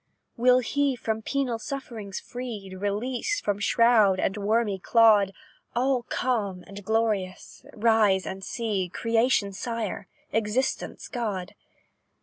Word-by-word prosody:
"Will 250 Hz, +1 st, +4 dB
he, 280 Hz, +2 st, 0 dB
from 220 Hz, -2 st, -3 dB
penal 255 Hz, -1 st, -1 dB
sufferings 225 Hz, -7 st, -6 dB
free, 230 Hz, -6 st, -7 dB
Released 235 Hz, -, -2 dB
from 205 Hz, -1 st, 0 dB
shroud 215 Hz, -3 st, +4 dB
and 190 Hz, -, 0 dB
wormy 210 Hz, -1 st, 0 dB
clod, 210 Hz, -1 st, +5 dB, 0.4 s
All 255 Hz, +1 st, +2 dB
calm 205 Hz, -8 st, -1 dB
and 200 Hz, 0 st, -10 dB
glorious, 210 Hz, -4 st, -1 dB
rise 215 Hz, -4 st, +3 dB
and 190 Hz, 0 st, -6 dB
see 205 Hz, -5 st, -2 dB
Creation's 225 Hz, -4 st, +1 dB
Sire 230 Hz, -6 st, -3 dB, 0.3 s
Existence' 225 Hz, +4 st, -1 dB
God? 205 Hz, -7 st, -3 dB
220 Hz, 115 wpm, -26 LUFS, 200-240 Hz, 0.4 s, clod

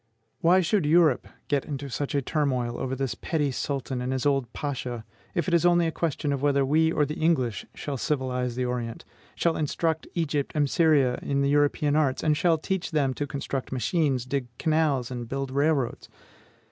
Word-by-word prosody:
Why 180 Hz, +3 st, +5 dB
should 180 Hz, -2 st, +1 dB
Europe 155 Hz, -4 st, +4 dB, 0.2 s
get 140 Hz, -2 st, +1 dB
into 140 Hz, -2 st, -5 dB
such 140 Hz, +2 st, -3 dB
a 140 Hz, -, +1 dB
turmoil 130 Hz, -5 st, 0 dB
over 130 Hz, 0 st, -2 dB
this 135 Hz, -1 st, -2 dB
petty 150 Hz, -4 st, -1 dB
Sultan 130 Hz, -1 st, -3 dB
and 125 Hz, +1 st, -2 dB
his 130 Hz, 0 st, -2 dB
old 135 Hz, -4 st, +1 dB
Pasha, 125 Hz, -5 st, -4 dB, 0.3 s
if 170 Hz, -, 0 dB
it 180 Hz, -, 0 dB
is 170 Hz, -, +4 dB
only 175 Hz, -1 st, +4 dB
a 165 Hz, -, 0 dB
question 155 Hz, -3 st, -1 dB
whether 140 Hz, 0 st, +2 dB
we 160 Hz, +4 st, +3 dB
or 150 Hz, -2 st, +2 dB
the 150 Hz, +2 st, -5 dB
English 130 Hz, -, +1 dB
shall 145 Hz, -2 st, -4 dB
civilize 125 Hz, -3 st, -1 dB
the 125 Hz, 0 st, -1 dB
Orient, 120 Hz, -2 st, -4 dB, 0.3 s
shall 170 Hz, -1 st, +1 dB
instruct 160 Hz, +1 st, -1 dB
Egypt 150 Hz, -4 st, -1 dB
and 145 Hz, -1 st, +2 dB
Syria 140 Hz, -5 st, +3 dB
in 140 Hz, 0 st, 0 dB
the 140 Hz, -, +2 dB
European 145 Hz, 0 st, +2 dB
arts, 140 Hz, -4 st, +1 dB
and 155 Hz, -1 st, +3 dB
shall 165 Hz, +1 st, +3 dB
teach 190 Hz, +3 st, -2 dB
them 145 Hz, -5 st, +1 dB
to 145 Hz, +2 st, -3 dB
construct 140 Hz, -1 st, -4 dB
machines, 130 Hz, +1 st, 0 dB
dig 130 Hz, -1 st, -2 dB
canals, 155 Hz, -6 st, +1 dB
and 120 Hz, -2 st, -5 dB
build 135 Hz, 0 st, -3 dB
railroads? 140 Hz, -2 st, 0 dB
140 Hz, 185 wpm, -26 LUFS, 130-155 Hz, 0.3 s, Why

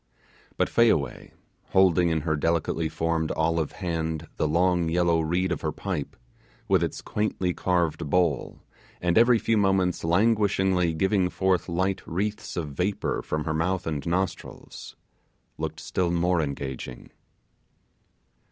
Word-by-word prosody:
But -, -, +2 dB
Fayaway, 80 Hz, -, +1 dB, 0.4 s
holding 90 Hz, -2 st, +4 dB
in 80 Hz, -1 st, 0 dB
her 80 Hz, 0 st, 0 dB
delicately 80 Hz, +1 st, 0 dB
formed 80 Hz, 0 st, -1 dB
olive 80 Hz, -1 st, 0 dB
hand 80 Hz, -3 st, -3 dB
the 75 Hz, -, +1 dB
long 85 Hz, +1 st, +2 dB
yellow 85 Hz, 0 st, +2 dB
reed 90 Hz, +3 st, 0 dB
of 85 Hz, -, -2 dB
her 80 Hz, -, -1 dB
pipe, 80 Hz, -3 st, -4 dB, 0.5 s
with -, -, +3 dB
its -, -, -3 dB
quaintly 100 Hz, -4 st, -1 dB
carved 85 Hz, -6 st, 0 dB
bowl, 85 Hz, -5 st, 0 dB, 0.4 s
and 90 Hz, -1 st, 0 dB
every 120 Hz, +1 st, +6 dB
few 115 Hz, 0 st, +1 dB
moments 95 Hz, -3 st, +1 dB
languishingly 95 Hz, -2 st, +2 dB
giving 95 Hz, +2 st, +2 dB
forth 95 Hz, -2 st, 0 dB
light 95 Hz, +3 st, 0 dB
wreaths 100 Hz, +5 st, -3 dB
of 80 Hz, -4 st, -2 dB
vapour 90 Hz, +8 st, -1 dB
from 75 Hz, 0 st, -3 dB
her 80 Hz, -, -2 dB
mouth 90 Hz, +3 st, -1 dB
and 75 Hz, -4 st, -3 dB
nostrils, 90 Hz, +1 st, -4 dB, 0.6 s
looked 80 Hz, 0 st, -4 dB
still 90 Hz, -2 st, -1 dB
more 85 Hz, 0 st, +1 dB
engaging. 70 Hz, -4 st, -5 dB
85 Hz, 135 wpm, -26 LUFS, 80-95 Hz, 0.6 s, every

